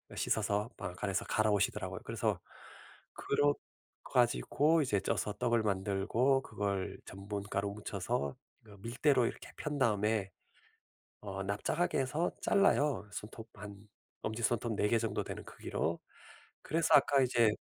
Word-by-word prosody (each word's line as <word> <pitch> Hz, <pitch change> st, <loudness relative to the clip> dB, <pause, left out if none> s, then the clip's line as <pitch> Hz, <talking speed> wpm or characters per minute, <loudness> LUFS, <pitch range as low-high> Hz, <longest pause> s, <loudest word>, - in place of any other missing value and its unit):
씻어서 105 Hz, 0 st, 0 dB
방앗간에서 100 Hz, +1 st, -2 dB
갈아오시더라고요. 105 Hz, -2 st, +1 dB
그래서 -, -, -1 dB, 0.8 s
그러 145 Hz, 0 st, +2 dB, 0.5 s
가지고 150 Hz, -, +3 dB
이제 115 Hz, -8 st, +1 dB
쪄서 105 Hz, -, -1 dB
떡을 120 Hz, +1 st, +1 dB
만들고 105 Hz, +7 st, +1 dB
그걸 100 Hz, -4 st, -2 dB
전분 100 Hz, +1 st, -5 dB
가루 100 Hz, +1 st, 0 dB
묻혀서 100 Hz, -, -2 dB, 0.3 s
그 105 Hz, -2 st, -14 dB
밀대로 125 Hz, +3 st, +2 dB
이렇게 -, -, -7 dB
편 150 Hz, -1 st, -3 dB
다음에 105 Hz, -4 st, +1 dB, 0.9 s
어 95 Hz, -2 st, -4 dB
납작하게 105 Hz, -, 0 dB
해서 150 Hz, +6 st, 0 dB
잘라요. 145 Hz, -, +3 dB
손톱 110 Hz, +2 st, -8 dB
한 105 Hz, -1 st, -8 dB, 0.5 s
엄지손톱 115 Hz, +1 st, 0 dB
4 105 Hz, -, +2 dB
개 115 Hz, -, +3 dB
정도 110 Hz, -2 st, -1 dB
되는 -, -, -6 dB
크기로. -, -, -3 dB, 0.6 s
그래서 165 Hz, +2 st, +2 dB
아까 140 Hz, -1 st, +6 dB
이제 120 Hz, -3 st, +4 dB
110 Hz, 290 characters per minute, -33 LUFS, 100-130 Hz, 0.9 s, 아까